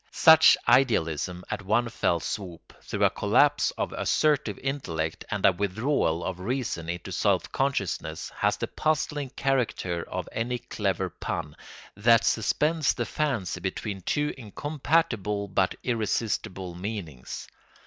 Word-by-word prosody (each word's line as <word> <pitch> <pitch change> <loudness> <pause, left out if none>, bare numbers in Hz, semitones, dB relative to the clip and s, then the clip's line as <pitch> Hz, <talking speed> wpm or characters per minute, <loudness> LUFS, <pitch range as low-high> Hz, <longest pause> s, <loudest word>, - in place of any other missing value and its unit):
Such 160 -1 +7
idealism 90 - +2
at - - -2
one 110 +5 +1
fell 85 -6 +1
swoop, 90 -1 -6
through - - -2
a - - +4
collapse - - +3
of - - -2
assertive 145 -9 +1
intellect 85 - -3
and 105 -2 -1
a 100 - +8
withdrawal 100 - 0
of 95 -1 -4
reason 100 -6 -3
into 90 0 -5
self - - +1
consciousness, 135 -9 -2
has - - +1
the - - -2
puzzling 150 -2 -1
character 120 -11 -1
of 90 -1 -4
any 120 +2 -2
clever 95 -6 -2
pun, 75 -2 -5 0.4
that 115 +3 +4
suspends 150 +8 +2
the 120 - -2
fancy 115 - -2
between 95 +2 -4
two 150 +9 0
incompatible 120 - -1
but 95 -1 +1
irresistible 105 -5 -2
meanings. 90 - -6
105 Hz, 130 wpm, -27 LUFS, 90-135 Hz, 0.4 s, a